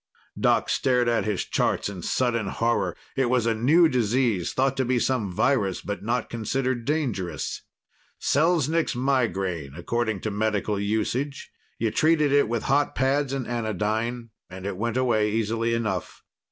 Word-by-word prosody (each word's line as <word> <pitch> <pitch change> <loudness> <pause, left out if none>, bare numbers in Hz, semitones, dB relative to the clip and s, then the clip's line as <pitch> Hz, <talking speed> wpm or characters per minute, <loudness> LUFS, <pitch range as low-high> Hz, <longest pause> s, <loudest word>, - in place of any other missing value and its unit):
Doc - - +3
stared 125 -2 +2
at 115 -4 +1
his 105 -3 -1
charts - - 0
in 100 -3 -6
sudden 115 +1 0
horror. 100 -4 0 0.2
It 130 -3 +1
was 125 -2 +2
a 115 - +2
new 150 +10 +4
disease 120 - +1
thought 135 0 +1
to 135 - +2
be 125 0 +1
some 120 -5 0
virus, 105 -2 +1
but 105 0 -4
not 120 +4 -1
considered 120 +1 -2
dangerous. 115 - -2 0.6
Selznik's 160 0 +2
migraine, 95 - -1
according 110 +3 -2
to 110 - -2
medical 105 0 -1
usage; 110 +7 -2 0.3
you 115 -1 0
treated 155 0 +3
it 140 -5 +3
with 115 -1 -1
hot 145 +2 +1
pads 135 +1 +1
and 135 -2 -2
anodyne, 115 +1 -2 0.2
and 95 +1 -9
it 100 -1 -3
went 115 +5 -2
away 115 -5 +2
easily 115 +2 0
enough. 105 -6 -3
115 Hz, 155 wpm, -25 LUFS, 105-130 Hz, 0.6 s, new